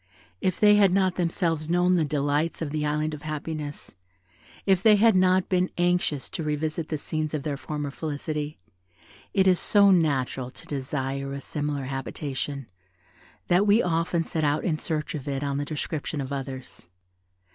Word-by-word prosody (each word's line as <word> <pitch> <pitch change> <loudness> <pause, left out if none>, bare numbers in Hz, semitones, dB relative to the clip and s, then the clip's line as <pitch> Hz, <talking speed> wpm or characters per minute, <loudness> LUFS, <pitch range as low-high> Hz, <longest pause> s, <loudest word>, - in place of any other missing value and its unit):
If 185 - 0
they 210 -1 +6
had 200 -3 +5
not 185 -1 +2
themselves 165 -3 0
known 175 +1 +3
the 175 -3 +3
delights 145 +2 0
of 145 - -4
the 155 0 -1
Island 150 +1 -1
of 150 - -7
Happiness, 155 -1 -5 0.7
if 190 -2 +3
they 215 0 +7
had 220 0 +5
not 185 0 +4
been 185 -1 +1
anxious 175 -6 +1
to - - -4
revisit 155 +1 -2
the 155 - -1
scenes 155 +1 -3
of 145 - -3
their 145 -2 -2
former 145 0 -4
felicity, 150 0 -4 0.7
it 190 -1 +3
is 185 -2 +5
so 200 -1 +5
natural 135 -7 +1
to - - -13
desire 135 -1 -3
a 140 - -4
similar 145 0 -3
habitation, 135 +1 -4 0.8
that 185 +4 +3
we 210 +3 +5
often 165 0 +1
set 160 0 -3
out 145 +1 +1
in 155 -4 0
search 155 -2 -3
of 145 -4 -6
it 140 0 -2
on 140 -1 -1
the 145 - -2
description 150 0 -4
of 135 0 -4
others. 130 -7 -7
155 Hz, 170 wpm, -26 LUFS, 145-175 Hz, 0.8 s, they